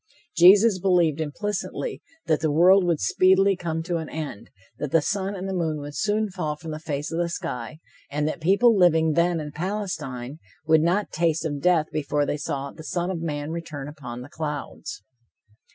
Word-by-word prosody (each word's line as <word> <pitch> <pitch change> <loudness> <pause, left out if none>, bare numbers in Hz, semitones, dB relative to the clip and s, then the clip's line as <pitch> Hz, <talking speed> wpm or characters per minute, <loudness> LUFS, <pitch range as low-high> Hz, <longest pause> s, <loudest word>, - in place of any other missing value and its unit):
Jesus 195 +4 +7
believed 175 -5 +2
implicitly 205 - -4 0.2
that 155 -2 +2
the 155 - 0
world 180 +5 +5
would 170 -3 +1
speedily 190 - +4
come 165 -2 -3
to 175 0 -1
an 160 -1 -5
end, 150 -10 -6 0.3
that 150 - -3
the 165 - +4
sun 195 +5 -2
and 190 0 -5
the 195 - -3
moon 160 -4 -1
would 145 0 -8
soon 215 0 0
fall 160 -5 -3
from 160 +1 -8
the 155 - -5
face 150 -1 -4
of 165 - -2
the 170 -1 0
sky, 125 -4 -5 0.3
and 150 +1 -1
that 155 - -4
people 200 +7 +4
living 160 -4 +4
then 170 +2 +2
in 150 -1 -6
Palestine 155 -7 -4 0.3
would 160 -1 +5
not 180 +6 +1
taste 165 0 0
of 145 -3 -3
death 175 -2 +3
before 145 -1 0
they 145 - -2
saw 140 -1 -4
"the 160 - -12
Son 175 +5 -2
of 170 -3 -4
Man 150 -2 -3
return 160 -4 -6
upon 125 -5 -8
the 130 - -10
clouds." 150 -2 -6
160 Hz, 190 wpm, -24 LUFS, 150-180 Hz, 0.3 s, Jesus